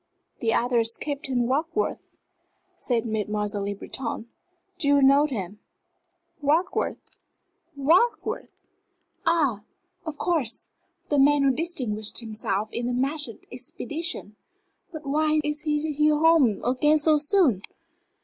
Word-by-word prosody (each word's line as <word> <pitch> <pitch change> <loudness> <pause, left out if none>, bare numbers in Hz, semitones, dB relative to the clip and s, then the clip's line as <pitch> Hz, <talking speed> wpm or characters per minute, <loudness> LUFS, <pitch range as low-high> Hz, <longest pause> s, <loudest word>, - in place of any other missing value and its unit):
"The 225 -2 +1
other 240 +1 +2
is 230 0 0
Captain 275 -4 -2
Warkworth," 320 - 0 0.8
said 240 -3 -1
Mademoiselle 210 -2 -2
Le 200 0 -3
Breton. 230 +2 -5 0.5
"Do 290 - 0
you 285 0 +5
know 275 +2 +5
him?" 210 -6 -5 0.8
"Warkworth 315 +6 +1 0.8
Warkworth? 335 - +2 0.8
Ah 290 -11 +2 0.4
of 315 -3 -6
course 310 -10 -1 0.4
the 290 - +2
man 285 +1 +5
who 275 - +4
distinguished 250 - -2
himself 215 -2 -2
in 240 0 -2
the 245 - -1
Mahsud 270 -1 -2
expedition. 250 -1 -5 0.6
But 315 -3 -8
why 305 +2 +2
is 300 0 -2
he 300 0 +1
home 300 -8 +4
again 280 +5 +3
so 305 0 +4
soon?" 295 - +3
275 Hz, 115 wpm, -25 LUFS, 230-305 Hz, 0.8 s, you